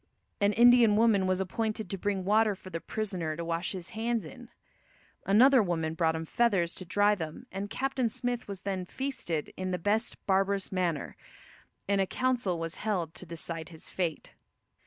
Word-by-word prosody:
An 205 0 +3
Indian 240 -2 +6
woman 210 -4 +4
was 185 0 +1
appointed 215 +2 -2
to - - -1
bring 195 -1 -2
water 215 +1 +3
for 185 0 -12
the 165 - -3
prisoner 185 -8 -3
to 170 - -4
wash 170 +3 -2
his 185 -2 -7
hands 225 -2 -1
in. 235 +10 -11 0.8
Another 250 +6 +6
woman 165 -5 -1
brought 160 -1 +1
him 160 0 -4
feathers 190 -4 +2
to 185 - -8
dry 205 +4 +3
them 160 -6 -5
and 195 +2 -4
Captain 260 0 -1
Smith 245 +2 -3
was 195 -2 -6
then 190 -2 -2
feasted 180 - -3
in 185 0 -3
the 180 - -1
"best 210 +6 0
barbarous 195 0 +1
manner," 175 -5 -1 0.7
and 200 0 +2
a 190 - +1
council 245 -6 0
was 165 +1 -4
held 185 -7 -2
to 175 +3 -7
decide 165 0 -6
his 160 -2 -9
fate. 170 -4 -3
195 Hz, 180 wpm, -29 LUFS, 170-220 Hz, 0.8 s, Indian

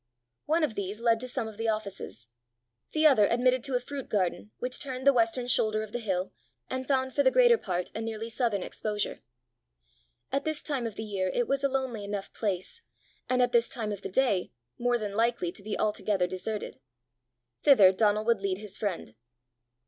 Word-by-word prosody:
One 320 +2 +2
of 295 - +1
these 200 +1 -4
led 230 -1 +3
to 255 - -5
some 235 -2 -2
of 220 -2 -9
the 225 0 -2
offices; 200 - -3 0.7
the 315 0 +2
other 255 -9 +6
admitted 250 +2 +2
to 270 - -1
a - - +3
fruit 275 +2 -7
garden 175 - -1
which 250 0 -3
turned 260 -2 -5
the 280 - +7
western 240 +1 +1
shoulder 215 -3 +2
of 215 - -9
the 240 - -3
hill, 190 -4 -2 0.4
and 260 0 -3
found 260 -2 +1
for 285 - +3
the 265 - +5
greater 485 - +6
part 180 -3 -3
a 220 - -4
nearly 225 0 -4
southern 230 -5 0
exposure. 210 -1 -3 1.1
At 275 - 0
this 310 -1 -2
time 270 -6 -2
of 220 - -7
the 220 - -5
year 195 -3 -1
it 245 - +1
was 275 0 0
a 275 - +3
lonely 260 -5 -2
enough 200 -1 -5
place, 200 - -3 0.5
and 250 0 +3
at 245 - +1
this 235 -1 +3
time 220 -4 -3
of 205 -1 -5
the - - -5
day 200 -4 +1 0.3
more 245 0 +2
than 210 -3 -4
likely 230 -5 +1
to 200 - -12
be 210 +1 -4
altogether 210 -3 +1
deserted: 185 -4 -4 0.8
thither 215 -11 +7
Donal 210 +2 +2
would 230 -3 +2
lead 195 -1 -1
his 205 -1 -7
friend. 185 - -3
225 Hz, 200 wpm, -29 LUFS, 200-255 Hz, 1.1 s, the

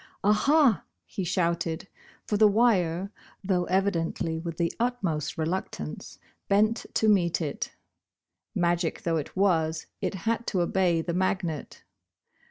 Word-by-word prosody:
"Ah, 205 +2 +5
ha!" 275 +1 +4 0.2
he 195 - -4
shouted, 170 -1 -1 0.4
for 210 - -1
the 215 +1 +6
wire, 200 -4 +2 0.3
though 185 -2 +1
evidently 170 -4 0
with 165 -1 -5
the 170 -1 0
utmost 190 - -1
reluctance, 160 - -4 0.3
bent 215 +3 +2
to 220 - +3
meet 180 -5 +3
it. 150 -4 -4 0.8
Magic 175 -1 0
though 165 -1 +1
it 155 +4 -5
was, 165 -5 +2 0.2
it - - -1
had 230 +1 0
to 185 - +1
obey 175 -2 +2
the 170 - -2
magnet. 180 -4 -2
180 Hz, 130 wpm, -27 LUFS, 165-200 Hz, 0.8 s, the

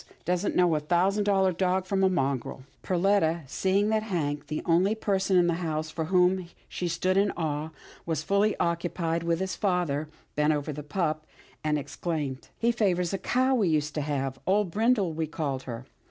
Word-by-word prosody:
Doesn't 180 +3 0
know 180 -2 +4
a 155 - +2
thousand 185 +6 +1
dollar 195 -2 +3
dog 185 +1 0
from 195 0 0
a 190 - +5
mongrel." 135 -6 -1 0.2
Perletta, 175 -3 +2
seeing 195 +9 +1
that 220 0 +2
Hank, 150 -9 -2
the 155 - -3
only 180 +5 +3
person 195 -3 +1
in 175 - +5
the 170 - +2
house 155 -2 -2
of 160 -2 -2
whom 180 0 +3 0.2
she 180 - -3
stood 185 +3 0
in 200 +1 +4
awe, 155 -2 -2 0.3
was 160 -3 -2
fully 200 +1 +2
occupied 170 -1 -1
with 170 0 0
his 190 0 -2
father, 175 -7 0 0.3
bent 150 +1 +3
over 150 +1 -2
the 150 - -6
pup, 155 0 -2 0.4
and 150 -1 +1
exclaimed, 145 -1 -4
" - - -41
He 235 +1 +2
favours 185 -6 +1
a 195 - -1
cow 260 +2 +2
we 215 -8 +2
used 150 -1 0
to 150 - -2
have. 135 -2 -2
Old 195 -1 +2
Brindle 215 -4 +2
we 160 0 -2
called 145 -4 -3
her. 120 +1 -6
175 Hz, 190 wpm, -27 LUFS, 155-190 Hz, 0.4 s, a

